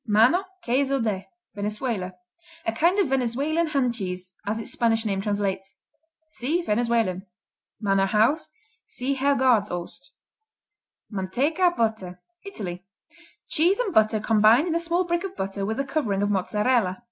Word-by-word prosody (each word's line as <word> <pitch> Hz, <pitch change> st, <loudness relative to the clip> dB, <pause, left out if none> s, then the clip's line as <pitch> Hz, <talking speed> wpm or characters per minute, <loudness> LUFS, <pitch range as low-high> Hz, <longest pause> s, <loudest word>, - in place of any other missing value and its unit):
Mano, 235 Hz, -, +4 dB, 0.2 s
Queso 270 Hz, +3 st, +1 dB
de 210 Hz, -5 st, -2 dB, 0.3 s
Venezuela 210 Hz, -2 st, -3 dB, 0.5 s
A -, -, +1 dB
kind 340 Hz, -, +2 dB
of 395 Hz, -8 st, +2 dB
Venezuelan 270 Hz, +6 st, 0 dB
hand 275 Hz, -5 st, +1 dB
cheese, 185 Hz, -4 st, -6 dB
as 215 Hz, +2 st, -1 dB
its 225 Hz, -, -6 dB
Spanish 225 Hz, -1 st, +1 dB
name 195 Hz, -2 st, -1 dB
translates. 195 Hz, -2 st, -2 dB, 0.6 s
(See 310 Hz, +7 st, -1 dB
Venezuelan.) 220 Hz, -, 0 dB, 0.5 s
Manor 195 Hz, -2 st, +2 dB
House 220 Hz, -, +2 dB, 0.4 s
see 270 Hz, +3 st, -2 dB
Herrgårdsost. 255 Hz, -10 st, +1 dB, 1.0 s
Manteca, 275 Hz, -, +1 dB
Butter 215 Hz, -6 st, -1 dB, 0.2 s
Italy 190 Hz, -, -6 dB, 0.6 s
Cheese 350 Hz, +6 st, +2 dB
and 465 Hz, -7 st, -1 dB
butter 215 Hz, 0 st, +3 dB
combined 220 Hz, +5 st, +4 dB
in 330 Hz, -, 0 dB
a 335 Hz, -, +1 dB
small 340 Hz, +2 st, 0 dB
brick 345 Hz, 0 st, -1 dB
of 385 Hz, -1 st, -6 dB
butter 195 Hz, +1 st, -3 dB
with 220 Hz, +4 st, -2 dB
a 275 Hz, -, 0 dB
covering 245 Hz, -9 st, -1 dB
of 205 Hz, -, +1 dB
Mozzarella. 210 Hz, 0 st, +1 dB
225 Hz, 135 wpm, -25 LUFS, 200-280 Hz, 1.0 s, Mano